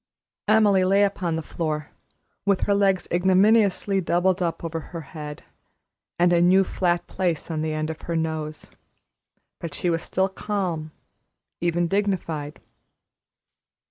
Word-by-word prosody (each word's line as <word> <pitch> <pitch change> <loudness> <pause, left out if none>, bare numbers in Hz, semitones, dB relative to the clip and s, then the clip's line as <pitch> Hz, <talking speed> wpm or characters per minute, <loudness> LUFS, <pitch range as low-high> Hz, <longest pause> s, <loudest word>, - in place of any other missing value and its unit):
Emily 205 -3 +5
lay 195 +2 +4
upon 185 -4 0
the 160 - -3
floor, 155 -2 -3 0.5
with 200 -1 +2
her 200 - +2
legs 195 -2 +2
ignominiously 195 +2 +3
doubled 180 +2 +1
up 170 -1 -2
over 165 0 -3
her 165 +1 -8
head, 150 0 -8 0.7
and 175 0 +4
a 170 - +4
new 185 +2 +5
flat 175 -2 0
place 175 -3 -2
on 155 -1 -2
the 155 0 -1
end 155 +1 -2
of 160 - -10
her 170 - -3
nose; 160 -1 -3 0.9
but 165 -4 -6
she 175 - 0
was 165 0 0
still 190 +2 0
calm, 185 -5 -3 0.7
even 175 0 +1
dignified. 165 -6 -2
175 Hz, 140 wpm, -24 LUFS, 160-195 Hz, 0.9 s, Emily